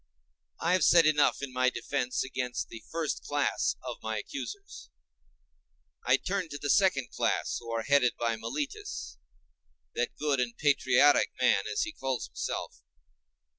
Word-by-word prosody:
I 170 - +1
have 185 - +3
said 170 -2 +6
enough 150 -2 +3
in 135 -2 -5
my 130 0 +3
defence 125 0 -2
against 125 -1 -3
the 115 - -9
first 160 -2 -2
class 145 0 0
of - - -6
my - - -3
accusers; 405 -1 -7 1.1
I 125 +2 +4
turn 185 +2 -3
to 145 - -6
the 145 -1 0
second 140 - +2
class, - - -1
who 115 - -10
are 115 -1 -1
headed 140 -2 +3
by 115 -1 0
Meletus, 290 - -5 0.7
that 465 0 -2
good 145 -3 0
and 120 -1 -2
patriotic 140 -1 +4
man, - - +3
as 430 - 0
he 320 - -4
calls 135 - -3
himself. 65 +1 -5
140 Hz, 150 wpm, -29 LUFS, 125-170 Hz, 1.1 s, said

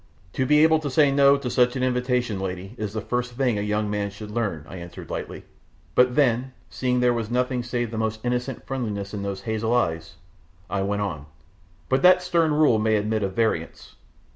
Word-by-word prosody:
"To 130 - 0
be 150 +2 +5
able 160 0 +5
to 150 -2 -4
say 140 +1 +4
no 140 0 +5
to 140 -2 -5
such 125 0 +3
an 130 - -1
invitation, 125 -4 0
lady, 95 +1 -5
is 105 -4 -5
the 110 - -3
first 125 +2 -2
thing 120 -4 0
a - - -1
young 105 +1 -1
man 105 0 -2
should 105 +1 -9
learn," 100 -10 -2
I 95 - -9
answered 85 -1 -9
lightly; - - -5 0.5
but 125 0 +4
then, 130 -2 +2 0.2
seeing 125 -1 0
there 125 -1 +4
was 115 -2 -3
nothing 125 +1 0
save 120 -1 -3
the 110 - -3
most 110 0 -1
innocent 125 +1 -2
friendliness 105 -6 -4
in 100 - -4
those 100 -1 -4
hazel 110 +3 -1
eyes, 80 -7 -1 0.6
I 100 0 0
went 100 +1 -1
on, 75 -8 -5 0.6
"but 130 +1 +1
that 180 0 +6
stern 170 -3 +2
rule 150 -7 +4
may 110 0 +2
admit 110 +1 0
of 95 -1 -2
variance. 110 -8 -2
115 Hz, 205 wpm, -24 LUFS, 100-130 Hz, 0.6 s, that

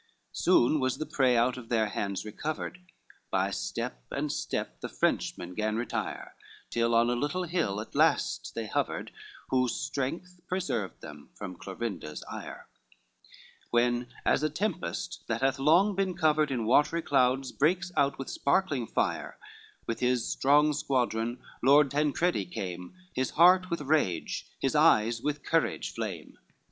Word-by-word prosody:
XVI - - -39
Soon 135 +6 +4
was 130 -2 0
the 155 - -3
prey 130 -5 +2
out 120 +2 +2
of 120 -3 -10
their 115 -2 +2
hands 100 0 -3
recovered, 150 - -4 0.5
By - - +1
step - - -4
and - - -2
step - - -3
the - - -4
Frenchmen 90 +1 -1
gan 110 +2 -1
retire, 120 +2 -3 0.4
Till 115 0 +1
on 120 +1 +4
a - - +1
little 145 +9 -1
hill 165 - -1
at 110 - -8
last - - +2
they 115 - -3
hovered, 105 - -2 0.4
Whose 125 -2 +2
strength 170 +7 -4
preserved 170 - -2
them 75 -2 -11
from 95 -3 -7
Clorinda's 95 -5 -5
ire: - - -8 1.0
When, 120 +1 +2 0.2
as - - +3
a 155 - +1
tempest 180 +5 -3
that - - -1
hath 135 +1 +1
long 170 +9 +4
been 190 -2 -1
covered 155 -1 +3
In 120 -4 -1
watery 150 +7 +3
clouds 130 -1 +2
breaks 175 +5 +1
out 140 -1 +2
with 135 - -6
sparkling 140 -6 0
fire, - - -1 0.5
With 115 - -3
his 125 -1 +1
strong 150 +2 +3
squadron 120 -4 -1 0.2
Lord 140 +2 +5
Tancredi 150 - +1
came, 90 - -6 0.2
His 130 0 0
heart 180 +2 +6
with 170 -3 -2
rage, 140 - 0
his - - 0
eyes 115 +2 +4
with 150 0 -2
courage 165 -1 0
flame. 100 -9 -6
130 Hz, 150 wpm, -29 LUFS, 115-155 Hz, 1.0 s, heart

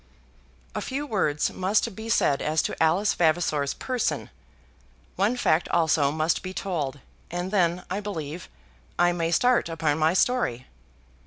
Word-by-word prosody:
A - - -3
few 275 +2 -3
words 155 - 0
must 195 +3 0
be 220 +2 -7
said 145 -10 +2
as 155 +1 +1
to - - -2
Alice 175 +6 +3
Vavasor's 155 -4 +1
person; 255 -3 -2 0.8
one 210 +7 +1
fact 165 -8 +2
also 160 -4 +2
must 155 +2 0
be 185 0 -7
told, 145 -8 -3 0.3
and 175 +2 -4
then, 180 -3 +1
I 190 +3 -2
believe, 170 -5 -6 0.5
I 175 0 +4
may 170 -1 -1
start 245 +2 +2
upon 160 -2 0
my 160 +3 +3
story. 185 - +1
175 Hz, 145 wpm, -26 LUFS, 155-200 Hz, 0.8 s, I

